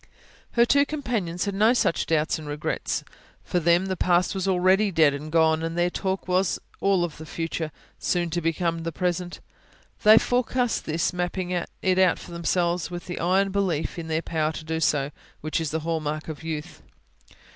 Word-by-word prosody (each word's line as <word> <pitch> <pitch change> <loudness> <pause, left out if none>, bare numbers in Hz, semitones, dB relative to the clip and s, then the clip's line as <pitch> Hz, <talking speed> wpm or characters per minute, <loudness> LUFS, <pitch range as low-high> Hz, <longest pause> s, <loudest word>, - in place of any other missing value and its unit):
Her 235 0 +5
two 280 +3 +4
companions 235 - -2
had 200 - -2
no 215 +5 +4
such 170 - +1
doubts 160 +1 +1
and 155 - -9
regrets; 145 0 -2 0.4
for 180 - 0
them 170 +2 +3
the 190 -1 -2
past 180 0 +2
was 190 -1 -2
already 190 +2 +3
dead 160 -5 +4
and 150 +2 -6
gone; 160 0 +2
their 175 0 +1
talk 190 0 -2
was 180 -4 +1 0.2
all 195 -3 +2
of 170 -4 -4
the 160 - -8
future, 165 0 -3 0.3
so - - 0
soon 175 -2 -1
to 175 - -1
become 165 +1 0
the 165 0 -3
present. 180 +1 -2 0.6
They 215 0 +8
forecast 245 0 +1
this, 160 +3 0
mapping 180 +1 -2 0.3
it 185 -1 +3
out 185 -2 +4
for - - -11
themselves 170 +1 0
with 175 -1 -6
the 175 - -5
iron 190 +3 +2
belief 185 -5 -1
in 165 - -6
their 160 +1 -1
power 155 -1 0
to 155 - -7
do 160 0 -2
so, 145 -3 +1 0.3
which 155 +2 -1
is 160 - -2
the 160 +1 -2
hall 165 0 -1
mark 155 0 -4
of 155 - -6
youth. 155 -2 -5
175 Hz, 190 wpm, -25 LUFS, 160-190 Hz, 0.6 s, They